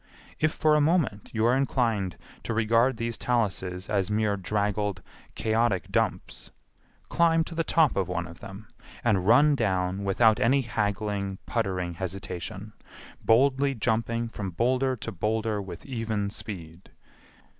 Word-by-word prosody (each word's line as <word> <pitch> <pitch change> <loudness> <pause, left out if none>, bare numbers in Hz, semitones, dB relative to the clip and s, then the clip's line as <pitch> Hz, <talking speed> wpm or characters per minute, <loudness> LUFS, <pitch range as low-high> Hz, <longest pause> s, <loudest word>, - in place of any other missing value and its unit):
If 155 0 +2
for 155 -1 +2
a 150 - +4
moment 150 - +1
you 110 0 0
are 120 +2 +4
inclined 115 -8 0 0.2
to 115 - -3
regard 115 +3 +3
these 115 0 -2
taluses 95 -6 -1
as 100 -2 0
mere 105 -1 +1
draggled, 100 -1 -1 0.3
chaotic 110 -3 0
dumps, - - -2 0.6
climb 165 -1 +3
to 170 - -9
the 165 0 0
top 160 -3 +3
of 95 -3 0
one 90 -1 -2
of 85 0 -12
them, 100 +3 -10 0.4
and 100 -6 +1
run 145 +6 +6
down 95 -5 0
without 105 +3 +3
any 135 +4 +3
haggling, 105 -3 -2
puttering 95 -6 -2
hesitation, 95 +3 -6 0.5
boldly 135 +3 +3
jumping 115 +1 0
from 105 -4 -5
boulder 130 +7 +1
to 115 - -6
boulder 105 +3 -1
with 95 -3 -9
even 110 -6 -2
speed. 85 -5 -8
110 Hz, 140 wpm, -27 LUFS, 95-120 Hz, 0.6 s, run